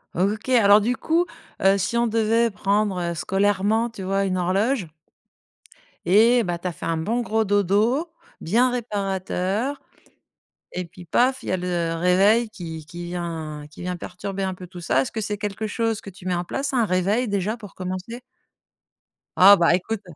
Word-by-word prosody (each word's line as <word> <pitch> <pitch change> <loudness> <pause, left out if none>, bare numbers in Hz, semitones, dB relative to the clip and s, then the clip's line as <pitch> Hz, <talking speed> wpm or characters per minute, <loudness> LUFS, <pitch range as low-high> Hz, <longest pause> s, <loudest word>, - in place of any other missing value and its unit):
O 180 - +1
OK, 215 +4 -8
alors 210 -4 +6
du 245 +4 0
coup, 335 +2 +1 0.4
heu, 195 +1 +5
si 200 +4 -2
on 235 0 +2
devait 230 +1 +2
prendre, 200 -1 0
heu, - - -3
scolairement, 205 +6 +1
tu 210 -4 -9
vois, 195 +1 0
une 185 -1 -1
horloge 195 - 0 1.2
Et 230 +5 +5
ben, 175 -2 -2
tu 180 - -5
as - - -2
fait - - -8
un 165 - 0
bon 215 +10 -1
gros 220 -1 0
dodo, 205 - +1 0.3
bien 240 +9 +2
réparateur, 205 +2 -2 0.9
et 180 0 -3
puis 175 +1 -13
paf, 255 +9 +2
il - - -8
y - - 0
a 185 - +2
le 175 -2 -2
réveil 195 +7 +3
qui 165 -6 -8
qui 175 +2 -8
vient 165 -4 -5
qui - - -14
vient 180 0 -3
perturber 195 +3 -6
un 190 - -1
peu 180 0 -10
tout 180 0 -10
ça. 135 -6 +2
Est-ce - - -6
que 220 - -3
c'est 205 0 -3
quelque 210 +1 -3
chose 225 0 -1
que 200 - -9
tu 185 0 -14
mets 180 - 0
en 175 - -2
place, 275 +10 -3
un 240 -3 +3
réveil 200 +6 +1
déjà 205 +3 -1
pour 210 -4 -12
commencer? 185 +6 -6 1.2
Ah 195 +2 +9
bah! 170 -2 +4
Ecoute! 210 +4 -3
200 Hz, 190 wpm, -23 LUFS, 180-225 Hz, 1.2 s, Ah